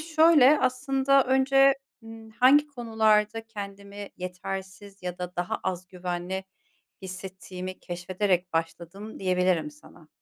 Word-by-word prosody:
şöyle, 310 Hz, -3 st, +5 dB
aslında 270 Hz, +1 st, +2 dB
önce, 270 Hz, +1 st, +4 dB, 0.3 s
ııı, 225 Hz, 0 st, -11 dB
hangi 290 Hz, +4 st, +6 dB
konularda 225 Hz, -4 st, +1 dB
kendimi 200 Hz, -1 st, -8 dB
yetersiz 190 Hz, +2 st, -7 dB
ya 180 Hz, 0 st, -5 dB
da 180 Hz, 0 st, -6 dB
daha 175 Hz, 0 st, -2 dB
az 185 Hz, 0 st, -3 dB
güvenli 180 Hz, +1 st, -4 dB, 0.6 s
hissettiğimi 185 Hz, 0 st, -7 dB
keşfederek 180 Hz, +1 st, -1 dB
başladım 170 Hz, +5 st, -4 dB
diyebilirim 180 Hz, -4 st, +1 dB
sana. 150 Hz, +1 st, -18 dB
195 Hz, 105 wpm, -27 LUFS, 180-250 Hz, 0.6 s, hangi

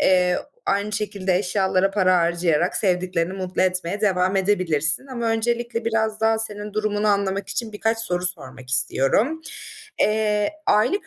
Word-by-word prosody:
eee, 180 Hz, -1 st, +3 dB, 0.3 s
aynı 200 Hz, +1 st, 0 dB
şekilde 200 Hz, -3 st, -1 dB
eşyalara 190 Hz, 0 st, +1 dB
para 185 Hz, -2 st, +2 dB
harcayarak 170 Hz, -1 st, +1 dB
sevdiklerini 180 Hz, -2 st, 0 dB
mutlu 185 Hz, -1 st, -2 dB
etmeye 185 Hz, +1 st, 0 dB
devam 190 Hz, -2 st, +1 dB
edebilirsin. 185 Hz, -, +1 dB
Ama 240 Hz, -3 st, -4 dB
öncelikle 235 Hz, +1 st, -1 dB
biraz 220 Hz, -1 st, -1 dB
daha 225 Hz, 0 st, +2 dB
senin 210 Hz, -1 st, -3 dB
durumunu 215 Hz, 0 st, -1 dB
anlamak 200 Hz, -1 st, 0 dB
için 230 Hz, -2 st, -3 dB
birkaç 225 Hz, +2 st, -1 dB
soru 180 Hz, -5 st, +1 dB
sormak 130 Hz, -6 st, -2 dB
istiyorum. 135 Hz, -, +2 dB, 0.6 s
Eee, 210 Hz, -1 st, +1 dB, 0.2 s
aylık 290 Hz, -, +2 dB
200 Hz, 135 wpm, -22 LUFS, 180-220 Hz, 0.6 s, eee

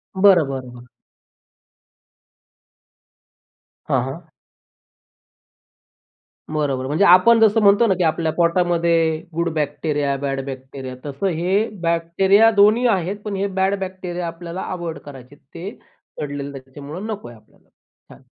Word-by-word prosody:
बरं, 190 Hz, -4 st, +5 dB
बरं, 130 Hz, -2 st, -5 dB
बरं. 120 Hz, 0 st, -13 dB, 3.0 s
हां, 130 Hz, -2 st, +1 dB
हां. 155 Hz, +6 st, -8 dB, 2.3 s
बरोबर. 135 Hz, -4 st, -1 dB
म्हणजे 155 Hz, +8 st, +2 dB
आपण 200 Hz, +6 st, +6 dB
जसं 220 Hz, 0 st, +4 dB
म्हणतो 205 Hz, +3 st, +5 dB
ना 195 Hz, -, +3 dB
की 180 Hz, -, +1 dB
आपल्या 160 Hz, 0 st, 0 dB
पोटामध्ये 170 Hz, -2 st, +2 dB, 0.2 s
गुड 170 Hz, +1 st, -1 dB
बॅक्टेरिया, 145 Hz, -1 st, -1 dB
बॅड 135 Hz, 0 st, -3 dB
बॅक्टेरिया. 130 Hz, -1 st, -8 dB
तसं 145 Hz, +7 st, -3 dB
हे 195 Hz, +6 st, +1 dB
बॅक्टेरिया 170 Hz, +6 st, +3 dB
दोन्ही 215 Hz, +5 st, +5 dB
आहेत. 195 Hz, -2 st, 0 dB
पण 210 Hz, -2 st, -3 dB
हे 195 Hz, +1 st, -1 dB
बॅड 190 Hz, +1 st, +2 dB
बॅक्टेरिया 185 Hz, -2 st, -5 dB
आपल्याला 170 Hz, +2 st, -7 dB
अव्हॉइड 170 Hz, -4 st, -5 dB
करायचे 135 Hz, -1 st, -12 dB
आहेत. 145 Hz, -, -30 dB
ते 180 Hz, +5 st, -8 dB, 0.4 s
सडलेले 145 Hz, -1 st, -5 dB
आहे 140 Hz, -1 st, -8 dB
त्याच्यामुळं 140 Hz, +8 st, -9 dB
नको 215 Hz, -2 st, -6 dB
आहे 120 Hz, -, -12 dB
आपल्याला. 110 Hz, -, -27 dB
छान. -, -, -22 dB
170 Hz, 125 wpm, -20 LUFS, 140-190 Hz, 3.0 s, आपण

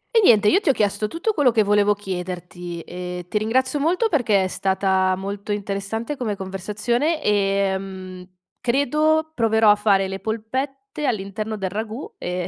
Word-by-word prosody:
E -, -, +7 dB
niente, 215 Hz, -, +6 dB
io 380 Hz, -, +4 dB
ti 360 Hz, -, 0 dB
ho -, -, +6 dB
chiesto 210 Hz, -1 st, 0 dB
tutto 335 Hz, -, -2 dB
quello 290 Hz, -8 st, +3 dB
che 225 Hz, -2 st, +3 dB
volevo 205 Hz, 0 st, +3 dB
chiederti, 180 Hz, -3 st, -6 dB
e 180 Hz, 0 st, -6 dB
ti 210 Hz, -, -1 dB
ringrazio 260 Hz, +6 st, +1 dB
molto 355 Hz, +10 st, +2 dB
perché 225 Hz, -, +2 dB
è -, -, 0 dB
stata 190 Hz, 0 st, +1 dB
molto 200 Hz, +2 st, -5 dB
interessante 205 Hz, +5 st, -3 dB
come 220 Hz, -5 st, -2 dB
conversazione, 215 Hz, -, -1 dB
ehm, 195 Hz, -2 st, -1 dB, 0.3 s
credo 300 Hz, +5 st, +2 dB
proverò 220 Hz, -4 st, +4 dB
a -, -, +5 dB
fare 200 Hz, -2 st, +2 dB
le 190 Hz, 0 st, -5 dB
polpette 265 Hz, -, -4 dB
all'interno 215 Hz, 0 st, -3 dB
del 190 Hz, -2 st, -3 dB
ragù 220 Hz, +5 st, -5 dB
e, 180 Hz, 0 st, -3 dB
210 Hz, 160 wpm, -22 LUFS, 190-245 Hz, 0.3 s, E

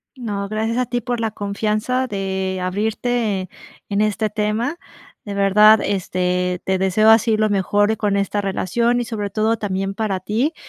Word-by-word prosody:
No, 205 Hz, -6 st, -4 dB
gracias 220 Hz, +2 st, -1 dB
a 250 Hz, -, +1 dB
ti 245 Hz, -, -1 dB
por 245 Hz, -1 st, -3 dB
la 225 Hz, -1 st, 0 dB
confianza 215 Hz, +5 st, -1 dB
de, 190 Hz, -3 st, -3 dB
abrirte, 215 Hz, +2 st, -1 dB
eh, 185 Hz, -, -8 dB, 0.4 s
en 200 Hz, 0 st, +1 dB
este 215 Hz, 0 st, 0 dB
tema. 215 Hz, -, -1 dB, 0.5 s
De 205 Hz, -, -5 dB
verdad, 210 Hz, +2 st, +6 dB
este, 180 Hz, -2 st, -1 dB
te 190 Hz, 0 st, 0 dB
deseo 190 Hz, +4 st, +3 dB
así 225 Hz, 0 st, +5 dB
lo 215 Hz, 0 st, +2 dB
mejor 205 Hz, +2 st, +2 dB
con 205 Hz, -2 st, 0 dB
esta 200 Hz, +1 st, 0 dB
relación, 235 Hz, +5 st, 0 dB
y -, -, -3 dB
sobre 210 Hz, -3 st, -4 dB
todo, 220 Hz, +2 st, 0 dB
también 195 Hz, -2 st, -2 dB
para 205 Hz, -3 st, -2 dB
ti. 230 Hz, -, 0 dB
210 Hz, 170 wpm, -20 LUFS, 195-225 Hz, 0.5 s, verdad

